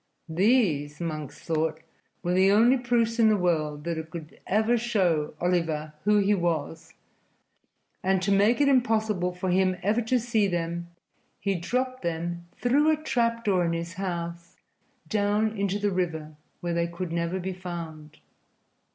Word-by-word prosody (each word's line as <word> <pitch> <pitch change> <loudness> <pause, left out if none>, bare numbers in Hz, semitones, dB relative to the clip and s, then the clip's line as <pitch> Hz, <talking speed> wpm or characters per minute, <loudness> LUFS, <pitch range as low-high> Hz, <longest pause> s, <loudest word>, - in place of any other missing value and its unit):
These, 160 - +2
Monks 155 -4 -5
thought, 160 -1 -1 0.4
were 175 - 0
the 190 +1 +5
only 230 +5 +5
proofs 240 -2 0
in 220 -1 +6
the 215 - +3
world 155 -5 0
that 160 -1 -4
could 160 -1 -9
ever 220 +4 +2
show 185 -11 0
Oliver 165 -4 0
who 210 0 +4
he 205 0 +3
was, 165 -4 -2 1.1
and 190 0 +2
to 200 - +1
make 205 +6 +4
it 285 - +4
impossible 220 -8 +2
for 180 +1 -3
him 185 0 +2
ever 215 +5 +2
to 245 +2 +1
see 225 -3 +1
them, 170 -1 -3 0.5
he 200 - 0
dropped 255 +8 -2
them 170 +1 -3
through 285 +5 +3
a 310 - +3
trap 230 -6 0
door 190 -4 +3
in 170 -1 0
his 170 +1 -4
house 170 -2 -5 0.5
down 210 +1 +1
into 200 -1 0
the 205 0 0
river, 160 -4 -2 0.3
where 175 -1 -2
they 170 0 +1
could 170 0 -5
never 170 +2 -1
be 185 +1 -3
found. 165 -4 -8
185 Hz, 155 wpm, -27 LUFS, 170-215 Hz, 1.1 s, in